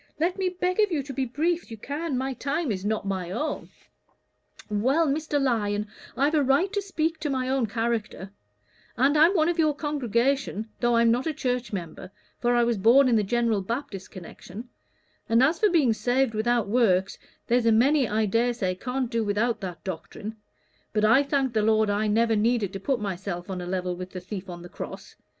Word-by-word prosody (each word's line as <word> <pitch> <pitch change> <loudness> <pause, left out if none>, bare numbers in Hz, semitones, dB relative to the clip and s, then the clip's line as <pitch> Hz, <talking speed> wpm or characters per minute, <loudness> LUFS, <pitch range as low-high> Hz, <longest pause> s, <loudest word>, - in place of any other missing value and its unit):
Let 355 +4 0
me 375 -1 +1
beg 365 +1 -2
of 420 -2 +3
you 300 -4 0
to 275 0 -7
be 265 0 -1
as - - -9
brief 335 +6 0
as - - -21
you 225 - -8
can. 285 +4 -3
My 265 +1 -2
time 285 +2 -2
is 190 -2 -3
not 210 0 -1
my 190 -3 -3
own." 250 +12 -3 1.0
"Well, 260 +10 +2
Mr. 295 +1 0
Lyon, 210 -6 0 0.3
I've 285 +3 +2
a 305 - +3
right 285 +9 +2
to 325 -6 -2
my 260 -2 -1
own 260 -3 +1
character; 225 -3 -3 0.7
and 275 +5 +3
I'm 325 +6 +5
one 315 -2 +3
of 345 -1 -1
your 305 -2 +3
congregation, 265 - -1
though 240 -1 +2
I'm 230 0 +4
not 250 +5 0
a 315 - -2
church 250 -2 -2
member, 180 -2 -6 0.3
for 240 0 +2
I 240 - +4
was 235 -3 0
born 255 +6 +6
in 235 - +3
the 215 - +4
General 225 0 +1
Baptist 200 -2 -5
connection: 190 +5 -10 0.6
and 230 +3 +4
as 315 +5 +2
for 425 - +4
being 300 -10 +3
saved 245 +3 +1
without 230 0 +1
works, 195 -4 +2 0.3
there's 240 -1 +2
a - - +5
many, 260 +4 +4
I 215 +1 +1
dare 235 +4 +1
say, 190 -6 -1
can't 250 +7 -3
do 230 -1 -1
without 215 +3 0
that 180 -3 -6
doctrine; 190 +4 -6 0.6
but 215 0 +2
I 230 +6 +6
thank 275 -3 0
the 215 - +2
Lord 215 -1 +3
I 210 +1 0
never 225 +2 +2
needed 215 -2 +1
to 195 - -5
put 260 +5 -1
_my_self 190 -2 -4
on 185 -1 -4
a 175 - -6
level 180 -1 -2
with 180 +1 -7
the 185 - -4
thief 190 +1 -7
on 175 -1 -8
the - - -8
cross. - - -8
235 Hz, 205 wpm, -26 LUFS, 205-280 Hz, 1.0 s, born